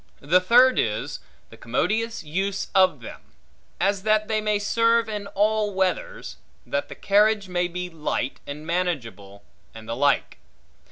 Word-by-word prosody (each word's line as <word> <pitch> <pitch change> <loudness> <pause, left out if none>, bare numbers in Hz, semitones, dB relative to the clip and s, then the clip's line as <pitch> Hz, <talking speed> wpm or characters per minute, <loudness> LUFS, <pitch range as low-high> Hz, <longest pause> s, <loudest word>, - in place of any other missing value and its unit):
The 170 +6 +3
third 250 +6 +5
is, - - -2 0.3
the - - -13
commodious 225 +1 -1
use 190 +6 -2
of 185 -8 +3
them; 110 - -10 0.6
as 200 0 +1
that 215 +1 +2
they 215 -1 0
may 210 -1 +1
serve 230 +2 +2
in 210 -2 -5
all 210 0 +1
weathers; - - -2 0.3
that - - -3
the - - -8
carriage 205 0 +2
may 180 -1 0
be 180 +1 -5
light 155 -5 -3
and 150 +2 -7
manageable; 120 - -3 0.3
and 110 0 -11
the 115 - -3
like. 140 +2 +1
195 Hz, 150 wpm, -24 LUFS, 160-215 Hz, 0.6 s, third